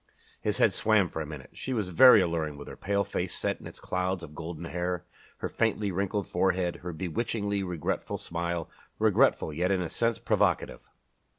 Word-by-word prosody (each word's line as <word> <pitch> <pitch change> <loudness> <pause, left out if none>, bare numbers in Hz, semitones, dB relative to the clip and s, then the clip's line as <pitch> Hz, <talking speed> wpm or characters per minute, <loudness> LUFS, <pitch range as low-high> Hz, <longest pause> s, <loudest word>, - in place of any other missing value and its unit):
His - - 0
head - - +4
swam 105 -4 +3
for 80 - -4
a 75 - -4
moment. 75 -4 -9
She 130 - -4
was 105 -6 -1
very 115 +5 +8
alluring 80 -4 -1
with 70 - -9
her - - -8
pale 100 0 0
face 95 -2 -3
set - - -1
in - - -9
its - - -11
clouds 90 0 -2
of 75 -2 -9
golden 80 +1 -6
hair, 90 +1 -2 0.3
her - - -3
faintly 105 -3 0
wrinkled 100 +2 -1
forehead, 90 -2 +1
her 90 0 -6
bewitchingly 100 +4 -2
regretful 90 -5 -2
smile 85 0 -3 0.3
regretful, 80 - +3
yet 90 +4 0
in 95 -1 +2
a 80 - -5
sense 115 -2 +1
provocative. - - +1
90 Hz, 185 wpm, -29 LUFS, 85-100 Hz, 0.3 s, very